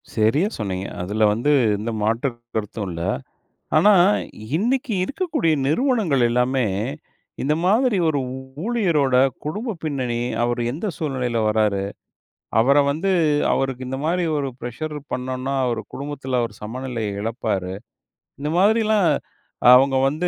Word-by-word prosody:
செரியா 115 - +3
சொன்னீங்க. 95 -2 -3
அதுல 105 +5 -1
வந்து 120 +7 +1 0.3
எந்த 110 +3 -3
மாற்று 115 +5 +1 0.3
கருத்தும் 105 -1 -3
இல்ல. 85 -1 -5 0.8
ஆனா, 205 +7 +6 0.6
இன்னைக்கு 245 - 0
இருக்கக்கூடிய 290 - 0
நிறுவனங்கள் 195 - +2
எல்லாமே 125 +1 +1 0.8
இந்த 150 +3 +2
மாதிரி, 220 +4 +3
"ஒரு 150 -2 +1 0.2
ஊ - - -5 0.3
ஊழியரோட 170 - +2 0.3
குடும்ப 210 +9 -3
பின்னணி, 130 -6 -2 0.2
அவர் 120 0 0
எந்த 160 +10 -4
சூழ்நிலையில 130 -6 -2
வராரு. 105 -2 +1 0.8
அவரை 135 +5 +4
வந்து 165 +7 -1 0.4
அவருக்கு 130 -1 -1
இந்த 135 +1 -3
மாதிரி 175 +3 +1
ஒரு 140 -2 -1
ப்ரெஷர் 135 +6 -5 0.2
பண்ணோம்னா, 130 +1 -3
அவரு 115 -2 -1
குடும்பத்துல 135 -3 -3
அவர் 115 - -5
சமநிலைய 115 -3 -4
எழப்பாரு" 105 -5 -2 0.7
இந்த 150 +1 -2
மாதிரிலாம் 215 0 +3 0.7
அவங்க 135 +1 +4
வந்து 155 +6 -1
135 Hz, 120 wpm, -22 LUFS, 115-170 Hz, 0.8 s, ஆனா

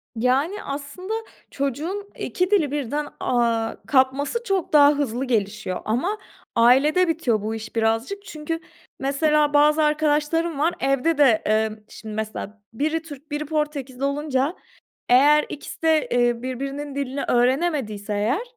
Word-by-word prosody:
Yani 270 - 0
aslında 285 +8 -5 0.4
çocuğun 315 +10 -3
2 365 +2 -1
dili 320 -9 +3
birden, 290 +1 -2
aaa, 230 -2 0
kapması 275 - +2
çok 390 -7 -1
daha 285 -1 +8
hızlı 270 -3 -2
gelişiyor 215 -5 -2
ama 280 - 0 0.4
ailede 275 +10 +5
bitiyor 260 -10 0
bu 220 +2 -3
iş 220 0 -8
birazcık. 230 - 0
Çünkü, 315 +2 -4 0.4
mesela 295 +2 +2
bazı 300 +1 +5
arkadaşlarım 300 +1 +1
var 330 +3 +2
evde 275 +4 +1
de, 260 -7 +5
emm, 215 0 +1
şimdi, 215 -1 -9
mesela 215 -1 -5
biri 310 +6 -1
Türk 300 -2 -12
biri 295 +1 -2
Portekizli 285 -4 -3
olunca, 280 +2 0 0.5
eğer 290 +4 +6
ikisi 290 - -8
de, 320 -1 +3
eee, 240 -1 +2
birbirinin 275 +2 -4
dilini 280 0 -3
öğrenemediyse, 245 -5 0
eğer, 220 - 0
280 Hz, 130 wpm, -23 LUFS, 240-310 Hz, 0.5 s, daha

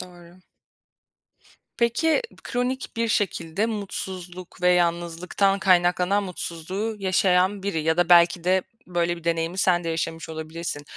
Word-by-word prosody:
Doğru. 175 0 -13 1.4
Peki, 245 - +2 0.2
kronik 250 0 -3
bir 230 0 0
şekilde 195 -1 0
mutsuzluk 185 -4 -6
ve 180 - +5
yalnızlıktan 175 +3 +1
kaynaklanan 180 +1 +3
mutsuzluğu 185 +5 -4
yaşayan 190 0 +2
biri 165 -6 -2
ya 160 +1 +1
da 175 -1 +2
belki 175 0 +5
de 185 +1 +3 0.2
böyle 175 -1 -1
bir 170 - -13
deneyimi 165 +2 -1
sen 175 -2 +3
de - - -2
yaşamış 165 0 -3
olabilirsin. 160 -1 -5
180 Hz, 125 wpm, -24 LUFS, 170-195 Hz, 1.4 s, ve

